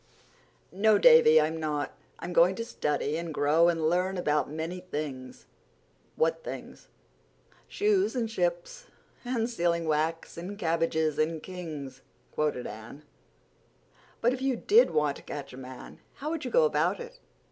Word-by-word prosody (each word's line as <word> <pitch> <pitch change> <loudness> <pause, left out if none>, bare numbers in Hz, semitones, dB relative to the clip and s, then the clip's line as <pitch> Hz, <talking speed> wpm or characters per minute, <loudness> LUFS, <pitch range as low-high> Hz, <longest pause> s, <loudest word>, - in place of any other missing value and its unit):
"No, 210 +2 +4
Davy, 160 -4 +7
I'm 160 +1 0
not. 150 -2 -2 0.3
I'm 175 - -6
going 180 +2 +5
to 230 - -4
study 150 -7 -2
and 170 -1 -4
grow 155 +3 +3
and 165 -2 0
learn 180 +3 0
about 150 -5 0
many 160 +4 -4
things." 145 -7 -6 0.7
"What 165 0 0
things?" - - -8 0.8
"'Shoes 410 -4 +1
and 235 -3 0
ships - - -3 0.4
and 245 -2 -1
sealing 170 -7 0
wax 160 +2 -1
And 185 +4 -6
cabbages 165 -3 0
and 155 0 0
kings,'" 150 -8 -7 0.3
quoted 150 -5 -1
Anne. 110 +7 -9 1.2
"But 240 +2 +3
if 260 - -5
you 265 -1 +1
did 440 - +4
want 150 -2 0
to - - -13
catch 140 -2 -7
a - - -10
man 130 -1 -10 0.2
how 300 +3 -4
would 330 -2 -4
you - - -2
go - - +4
about 475 - +1
it? 485 +1 -10
165 Hz, 150 wpm, -28 LUFS, 150-230 Hz, 1.2 s, Davy